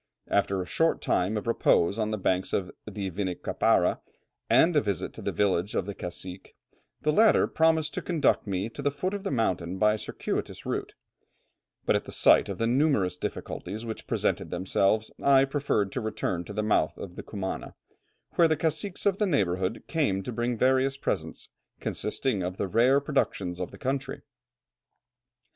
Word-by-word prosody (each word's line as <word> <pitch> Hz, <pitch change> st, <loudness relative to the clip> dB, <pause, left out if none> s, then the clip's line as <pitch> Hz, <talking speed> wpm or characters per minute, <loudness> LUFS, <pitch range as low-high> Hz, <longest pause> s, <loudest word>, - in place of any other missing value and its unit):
After 100 Hz, -1 st, +1 dB
a 90 Hz, -, -2 dB
short 165 Hz, -, +1 dB
time 95 Hz, +4 st, 0 dB
of 105 Hz, -, -4 dB
repose 110 Hz, -3 st, +2 dB
on 110 Hz, -1 st, 0 dB
the 110 Hz, -, -1 dB
banks 95 Hz, -1 st, 0 dB
of 90 Hz, -2 st, -1 dB, 0.2 s
the 100 Hz, -3 st, -4 dB
Vinicapara, 95 Hz, 0 st, +1 dB, 0.5 s
and 165 Hz, 0 st, +5 dB
a 150 Hz, -, +5 dB
visit 100 Hz, -5 st, -3 dB
to -, -, -10 dB
the -, -, -2 dB
village 100 Hz, +1 st, 0 dB
of -, -, 0 dB
the 100 Hz, -, -5 dB
cacique, 90 Hz, +1 st, -8 dB, 0.5 s
the 150 Hz, -, +3 dB
latter 220 Hz, +7 st, +5 dB
promised 160 Hz, -1 st, +2 dB
to -, -, -3 dB
conduct 155 Hz, -10 st, +1 dB
me 95 Hz, +1 st, -1 dB
to -, -, -8 dB
the 145 Hz, -, +2 dB
foot 185 Hz, +7 st, -3 dB
of 200 Hz, -, -3 dB
the -, -, -2 dB
mountain 95 Hz, -8 st, -1 dB
by 105 Hz, +2 st, +4 dB
a 110 Hz, -, -3 dB
circuitous -, -, -4 dB
route; -, -, -3 dB, 0.9 s
but -, -, +3 dB
at -, -, -1 dB
the -, -, -8 dB
sight -, -, +5 dB
of -, -, -4 dB
the 115 Hz, -, 0 dB
numerous 120 Hz, -, +2 dB
difficulties 105 Hz, +4 st, -5 dB
which 110 Hz, -1 st, -6 dB
presented -, -, 0 dB
themselves, 95 Hz, +4 st, +1 dB
I 135 Hz, -1 st, +5 dB
preferred 135 Hz, -8 st, 0 dB
to 125 Hz, -, -3 dB
return 95 Hz, -5 st, -2 dB
to 105 Hz, -, -8 dB
the 105 Hz, +1 st, -1 dB
mouth 105 Hz, -, +1 dB
of 90 Hz, -2 st, -8 dB
the -, -, -6 dB
Cumana, 100 Hz, -3 st, -5 dB, 0.6 s
where 170 Hz, -, +4 dB
the 155 Hz, -1 st, +1 dB
caciques 160 Hz, +5 st, -1 dB
of 200 Hz, -1 st, +2 dB
the 210 Hz, -, +2 dB
neighbourhood 95 Hz, -, 0 dB
came 135 Hz, -, 0 dB
to 125 Hz, -, -5 dB
bring 120 Hz, +1 st, -1 dB
various 130 Hz, +2 st, +2 dB
presents, 80 Hz, -11 st, -3 dB, 0.3 s
consisting 105 Hz, -1 st, -1 dB
of 90 Hz, +1 st, -3 dB
the 100 Hz, -, -1 dB
rare 120 Hz, +8 st, +4 dB
productions 100 Hz, -11 st, -1 dB
of 90 Hz, -, -3 dB
the -, -, -12 dB
country." 135 Hz, +1 st, -3 dB
110 Hz, 180 wpm, -27 LUFS, 95-140 Hz, 0.9 s, and